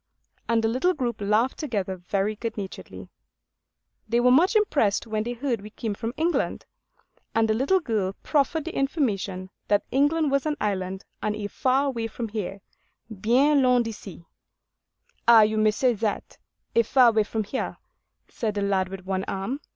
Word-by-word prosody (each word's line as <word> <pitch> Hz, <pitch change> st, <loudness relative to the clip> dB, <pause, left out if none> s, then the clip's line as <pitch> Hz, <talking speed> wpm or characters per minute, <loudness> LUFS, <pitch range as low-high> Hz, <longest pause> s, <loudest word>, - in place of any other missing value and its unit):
And 230 Hz, -1 st, +2 dB
the -, -, +3 dB
little 260 Hz, +11 st, +1 dB
group 240 Hz, -5 st, -3 dB
laughed 215 Hz, +5 st, +1 dB
together 205 Hz, -10 st, -2 dB
very 195 Hz, +4 st, -2 dB
good 225 Hz, +1 st, -5 dB
naturedly. 195 Hz, -2 st, -7 dB, 1.0 s
They 235 Hz, +2 st, +2 dB
were 250 Hz, +1 st, +4 dB
much 340 Hz, -, +4 dB
impressed 285 Hz, -, +2 dB
when 215 Hz, -1 st, -2 dB
they 240 Hz, +3 st, -3 dB
heard 240 Hz, -3 st, -2 dB
we 210 Hz, -, -9 dB
came 220 Hz, 0 st, -4 dB
from 225 Hz, +4 st, -5 dB
England; 335 Hz, +3 st, 0 dB, 0.7 s
and 225 Hz, 0 st, +3 dB
the 220 Hz, -, +2 dB
little 275 Hz, +12 st, +2 dB
girl 215 Hz, -, -1 dB
proffered 300 Hz, +1 st, +1 dB
the 335 Hz, -, -5 dB
information 200 Hz, -, -1 dB, 0.2 s
that 205 Hz, -1 st, +2 dB
England 290 Hz, +2 st, +2 dB
was 275 Hz, +2 st, +1 dB
an 300 Hz, -1 st, -1 dB
island 190 Hz, -2 st, -2 dB, 0.2 s
'and 210 Hz, 0 st, -1 dB
a 210 Hz, -1 st, -5 dB
far 265 Hz, +6 st, +1 dB
way 230 Hz, -3 st, -3 dB
from 225 Hz, 0 st, -5 dB
here—bien 220 Hz, +6 st, -1 dB
loin 250 Hz, -2 st, +4 dB
d'ici.' 205 Hz, -6 st, -8 dB, 1.0 s
'Ay, 230 Hz, -2 st, +9 dB
you 215 Hz, +1 st, +1 dB
may 215 Hz, 0 st, +4 dB
say 245 Hz, +4 st, +2 dB
that, 215 Hz, -1 st, -3 dB, 0.4 s
a 230 Hz, -, +6 dB
far 245 Hz, +1 st, +5 dB
way 220 Hz, -1 st, +3 dB
from 220 Hz, +1 st, -3 dB
here,' 260 Hz, +6 st, -4 dB, 0.5 s
said 220 Hz, -6 st, -3 dB
the 205 Hz, -, -1 dB
lad 190 Hz, -2 st, +1 dB
with 190 Hz, -1 st, -8 dB
one 190 Hz, 0 st, -1 dB
arm. 195 Hz, +9 st, -3 dB
225 Hz, 170 wpm, -25 LUFS, 205-265 Hz, 1.0 s, Ay